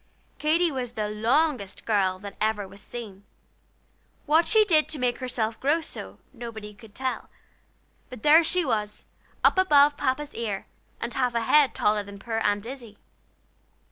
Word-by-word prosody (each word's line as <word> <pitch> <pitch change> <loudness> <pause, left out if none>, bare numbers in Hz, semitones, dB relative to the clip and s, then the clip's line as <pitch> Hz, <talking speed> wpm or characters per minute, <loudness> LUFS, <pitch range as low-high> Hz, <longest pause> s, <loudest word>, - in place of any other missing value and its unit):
Katy 330 +3 +2
was 250 -3 -4
the 215 -3 -2
longest 230 -1 0
girl 195 -4 +1
that 200 +1 -9
was - - -29 0.2
ever 195 -1 -8
seen. 200 -1 -9 1.0
What 320 +3 +3
she 435 -1 +5
did 315 -6 +3
to 310 - -2
make 250 -2 -1
herself 230 -3 -2
grow 290 +5 +2
so, 320 - -8 0.2
nobody 225 -4 -8
could 210 0 -16
tell; 260 0 -3 0.8
but 250 -4 -10
there 315 +3 +7
she 350 +1 +1
was 210 -4 -2 0.4
up - - +5
above 290 -5 +5
Papa's 285 +2 -2
ear, 210 -4 -4 0.3
and 235 - -4
half 250 -2 0
a 235 - +1
head 285 +4 +4
taller 210 0 +2
than 200 0 -10
poor 225 +2 -3
Aunt 205 -1 0
Izzie. 235 -4 -9
240 Hz, 160 wpm, -26 LUFS, 210-295 Hz, 1.0 s, there